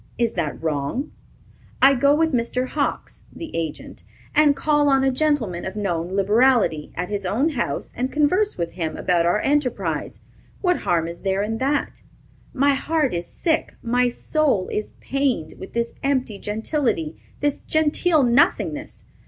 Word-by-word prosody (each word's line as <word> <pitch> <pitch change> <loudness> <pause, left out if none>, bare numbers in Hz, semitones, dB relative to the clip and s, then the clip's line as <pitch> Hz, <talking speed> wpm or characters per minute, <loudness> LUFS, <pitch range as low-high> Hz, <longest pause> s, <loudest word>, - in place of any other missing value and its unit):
Is 235 -2 +1
that 160 -3 -3
wrong? 155 - -2 0.7
I 275 +1 +7
go 280 +3 +4
with 320 0 +1
Mr. 250 +1 -1
Hawks 290 -2 -3
[the 330 - -8
agent], 165 -2 -5 0.3
and 295 -2 +5
call 295 -1 +2
on 270 -1 +3
a 270 - +3
gentleman 255 - 0
of 190 - -5
known 180 -4 -2
liberality, 210 - +3
at 180 +1 -3
his 205 -1 -2
own 225 - +1
house, 260 -7 -3
and 255 +2 -2
converse 365 +8 +2
with 170 -1 -2
him 165 -3 -4
about 170 -1 +2
our 175 +5 +2
enterprise. 280 -4 -1 0.4
What 360 -2 +2
harm 165 -2 0
is 170 0 -7
there 195 0 0
in 225 +2 -3
that? 280 +2 -1 0.5
My 280 +1 +3
heart 300 0 0
is 170 0 -3
sick, 325 -2 -1
my 245 +1 +2
soul 270 - 0
is 210 - -3
pained, 260 - -1
with 190 - -9
this 235 0 -1
empty 260 -7 -1
gentility, 220 - -2 0.2
this 290 -1 0
genteel 315 0 +2
nothingness. 245 +2 +1
250 Hz, 155 wpm, -22 LUFS, 190-290 Hz, 0.7 s, I